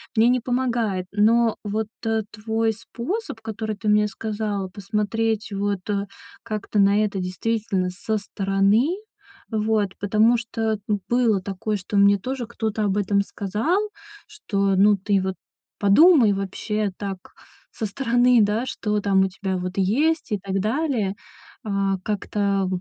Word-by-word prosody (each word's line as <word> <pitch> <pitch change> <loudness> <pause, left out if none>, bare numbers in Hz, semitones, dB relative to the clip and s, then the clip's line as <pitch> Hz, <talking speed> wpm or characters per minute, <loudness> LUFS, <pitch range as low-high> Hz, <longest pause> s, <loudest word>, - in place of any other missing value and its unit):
мне 225 +1 +5
не 250 0 +3
помогает. 235 -6 -1
Но 225 +2 +3
вот 215 +1 -1
т 225 -1 0
твой 220 +1 -1
способ, 235 - -5
который 220 0 -4
ты 210 +1 -2
мне 210 0 +4
сказала, 210 -2 -3
посмотреть 210 +3 -2
вот, 200 -1 -2
э, 200 -1 0 0.4
как-то 215 -2 -2
на 200 +2 +4
это 200 -2 -2
действительно 190 +1 -1
со 205 +4 -2
стороны. 200 +4 +1 0.6
Вот, 215 -2 +1
потому 215 +4 +3
что 225 -2 -2 0.3
было 235 -5 +2
такое, 200 +3 -3
что 200 +2 -3
мне 200 0 +6
тоже 250 +3 -4
кто-то 220 -2 -2
об 200 -1 0
этом 200 0 +2
сказал, 210 - -1 0.5
что, 200 - -1
ну 205 +2 +6
ты 195 0 +1
вот 190 0 -2 0.4
подумай 245 - +6
вообще 200 +2 -2
так 195 -2 -4 0.5
со 220 - -4
стороны, 245 +2 +3
да, 210 +4 +1
что 210 -4 -2
там 195 -1 +3
у 190 - +3
тебя, 190 0 -3
вот, 180 0 -4
есть 280 - +1
и 210 - +1
так 195 0 -2
далее. 225 -3 0 0.5
А, 195 -2 0
как-то, 200 -2 0
210 Hz, 140 wpm, -23 LUFS, 200-225 Hz, 0.6 s, мне